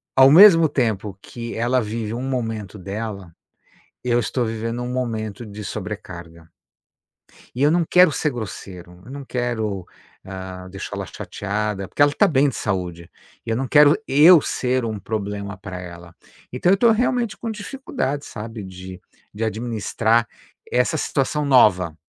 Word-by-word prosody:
ao 135 0 +7
mesmo 165 -2 +8
tempo 110 -8 -1
que 120 -1 -7
ela 120 +3 +1
vive 110 0 -4
um 120 +2 -4
momento 115 -6 -4
dela, 100 -2 -6 0.7
eu 120 -1 +1
estou 120 +1 -1
vivendo 115 +2 -3
um 125 - -4
momento 115 -3 -3
de 105 0 -9
sobrecarga. 85 -6 -8 1.1
E 125 - -3
eu 145 - +5
não 170 0 +2
quero 180 -2 +6
ser 150 +1 -1
grosseiro, 90 -6 -8
eu 125 - -11
não 140 0 -8
quero, 110 -7 -3 0.4
hã, 95 -1 -8
deixá-la 100 +1 -6
chateada 100 +4 -4
porque - - -4
ela 145 0 +6
tá - - +4
bem 145 -1 +3
de 130 - -7
saúde 90 -4 -3 0.4
e - - -6
eu 115 - +1
não 130 +3 -2
quero 150 +2 +6
eu 155 +4 +7
ser 130 -2 -1
um 110 -2 -4
problema 100 -1 -4
pra 95 -1 -8
ela. 85 -1 -11 0.4
Então 130 +9 +1
eu 195 - +4
tô 235 +3 +5
realmente 235 -1 0
com 230 - -5
dificuldade, 210 - -4
sabe, 110 0 -7
de 95 0 -10 0.3
de 105 +2 -4
administrar 115 0 0 0.4
essa 125 +6 +1
situação 150 +1 -1
nova. 95 - +4
115 Hz, 155 wpm, -22 LUFS, 100-135 Hz, 1.1 s, mesmo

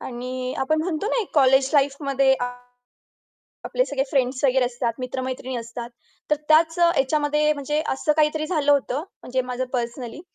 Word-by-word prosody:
आणि 255 +1 -5
आपण 310 +4 +1
म्हणतो 335 +2 -2
ना, 485 - +1
एक 400 - -11
कॉलेज 265 -2 +4
लाईफमध्ये, 275 -1 +2 1.3
आपले - - +1
सगळे 270 - -1
फ्रेंड्स 260 0 0
वगैरे 260 -1 +4
असतात, 240 -1 -2
मित्र-मैत्रिणी 255 0 -4
असतात. 235 +1 -6 0.4
तर 300 - +4
त्याच 320 +2 +4
ह्याच्यामध्ये 300 -2 +2
म्हणजे 295 +1 -2
असं 300 +3 +1
काहीतरी 310 0 +2
झालं 305 -4 +2
होतं 275 -2 +1 0.2
म्हणजे 255 +1 -1
माझं 250 0 -3
पर्सनली. 240 +2 -4
270 Hz, 145 wpm, -23 LUFS, 255-300 Hz, 1.3 s, कॉलेज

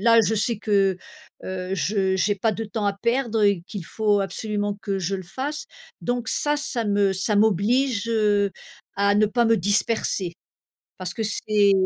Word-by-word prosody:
là 230 +2 +5
je 220 - +1
sais 220 +2 0
que, 195 -3 +2 0.5
heu, 185 0 -4
je 190 -1 0
j'ai 205 +2 +2
pas 220 +3 0
de 225 +2 -4
temps 215 -1 -3
à 200 - +1
perdre 235 0 0
et 200 -4 +3
qu'il 200 -6 -6
faut 210 0 +1
absolument 205 +1 -2
que 195 -2 -2
je 190 +2 -2
le 190 - -4
fasse. 275 - -4 0.3
Donc 245 -1 -2
ça, 295 0 +1
ça 290 -6 -2
me 200 -1 +2
ça 200 +3 0
m'oblige, 220 +3 +2
heu, 210 -3 +2 0.5
à 200 0 +3
ne 210 +1 +4
pas 235 +3 +1
me 225 0 +4
disperser. 200 -2 0 0.7
Parce 185 -1 -3
que 225 - -3
c'est 210 -1 +2
205 Hz, 175 wpm, -24 LUFS, 195-225 Hz, 0.7 s, là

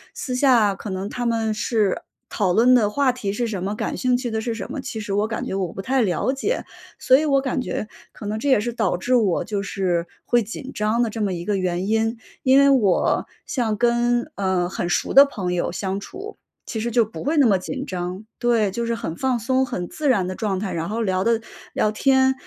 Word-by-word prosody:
私 255 - -4
下 245 -6 +4
可 200 +2 -8
能 190 +1 -3
他 245 - -4
们 225 -2 0
是 210 -2 0 0.3
讨 185 -4 +1
论 240 +5 +5
的 225 -5 +4
话 270 +4 +2
题 205 -6 -4
是 240 +3 -1
什 210 -5 -3
么、 200 +3 -2
感 - - -3
兴 250 -1 +2
趣 245 -2 -4
的 220 - -1
是 225 +1 -3
什 230 - -6
么， 295 - -4
其 225 - -5
实 205 -2 -4
我 205 +2 +1
感 220 - -3
觉 - - -4
我 190 -3 -2
不 195 - -5
太 260 +5 +1
了 210 +4 +1
解。 355 - -2 0.3
所 260 - +5
以 310 - 0
我 275 -2 +3
感 265 -1 -1
觉 215 -3 -4 0.2
可 - - -10
能 210 +1 -2
这 285 - -3
也 260 -6 +5
是 240 +2 -2
导 220 -6 0
致 215 +8 -1
我 205 -7 +2
就 205 -1 -3
是 180 -3 -1 0.2
会 240 -1 +3
紧 230 +5 -7
张 215 +3 +1
的 230 - 0
这 220 +1 -5
么 200 -3 0
一 175 -1 -4
个 205 +1 0
原 185 0 -1
因。 225 +1 +1 0.2
因 260 +1 +5
为 280 0 +6
我 220 -10 +2 0.2
像 230 -5 -1
跟， 240 +1 +1
呃， 190 -3 0
很 175 -1 -3
熟 - - 0
的 275 +1 +9
朋 190 -10 -3
友 175 - -1
相 190 +2 -3
处， 390 - -9 0.3
其 225 - -4
实 230 +2 -1
就 230 0 +3
不 220 - -8
会 300 +3 0
那 280 - +6
么 205 -5 +4
紧 - - -5
张。 180 +2 -5
对， 230 -4 +2
就 235 +5 -3
是 230 0 -1
很 170 -8 -5
放 260 +2 0
松、 260 +4 +1
很 180 -9 -4
自 300 -3 -2
然 200 -7 +3
的 185 - -3
状 195 -3 -1
态。 200 -2 -3
然 165 +1 -3
后 225 +2 -2
聊 185 -2 0
的 230 0 +2 0.3
聊 215 - +1
天 265 +3 +3
220 Hz, 260 characters per minute, -22 LUFS, 195-245 Hz, 0.3 s, 的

